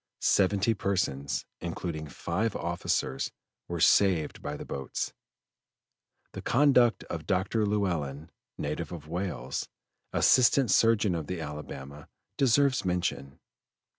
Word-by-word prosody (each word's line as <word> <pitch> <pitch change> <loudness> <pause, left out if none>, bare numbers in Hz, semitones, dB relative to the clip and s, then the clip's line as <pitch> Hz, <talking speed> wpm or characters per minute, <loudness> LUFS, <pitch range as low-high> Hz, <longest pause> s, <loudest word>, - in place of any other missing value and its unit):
Seventy 100 +3 +3
persons, 90 -9 -1
including 85 -2 -4
five 105 - -2
officers, 85 -6 -1 0.4
were 85 -1 -4
saved 85 -1 +3
by 75 0 -4
the - - -8
boats. 70 -2 -4 1.2
The - - -7
conduct 125 -3 +4
of 80 -2 -6
Dr. 105 +3 +1
Llewellyn, 80 -7 -2 0.3
native - - -3
of 80 -4 -8
Wales, 90 +2 -3 0.4
Assistant 130 -2 +4
Surgeon 110 -4 +4
of 80 -3 -3
the 90 -2 -3
Alabama, 75 -2 -7 0.3
deserves 135 0 +3
mention. 85 -7 -2
90 Hz, 105 wpm, -29 LUFS, 75-105 Hz, 1.2 s, conduct